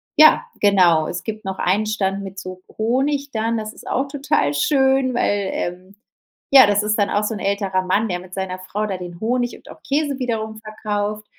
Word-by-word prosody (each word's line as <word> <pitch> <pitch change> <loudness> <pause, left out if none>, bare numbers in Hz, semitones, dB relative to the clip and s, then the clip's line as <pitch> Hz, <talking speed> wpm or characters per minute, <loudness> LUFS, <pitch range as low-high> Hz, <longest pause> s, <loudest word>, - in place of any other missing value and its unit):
ja, 310 +9 +7 0.2
genau. 180 -6 +4
Es 175 0 -5
gibt 215 -2 -6
noch 190 0 -4
einen 200 +4 +1
Stand 200 -2 -1
mit 195 0 -8
so 185 -1 -8
Honig 275 +5 0
dann, 225 +1 -1
das 215 0 -4
ist - - -14
auch 270 +2 0
total 275 - 0
schön, 265 - +2
weil 205 -5 0
ähm, 180 +3 -5 0.5
ja, 270 -2 +9
das 205 0 +2
ist 210 0 +1
dann 200 - +2
auch 205 +1 +1
so 220 - -1
'n - - -6
älterer 195 -1 0
Mann, 200 +4 +1
der 180 -2 -2
mit 185 0 -13
seiner 190 -1 -3
Frau 205 +3 -3
da 195 -3 -3
den 175 -1 -9
Honig 245 +2 -1
und - - -18
auch - - -13
Käse 285 -1 -1
wiederum 220 -3 -3
verkauft. 215 -1 -4
210 Hz, 205 wpm, -21 LUFS, 190-245 Hz, 0.5 s, ja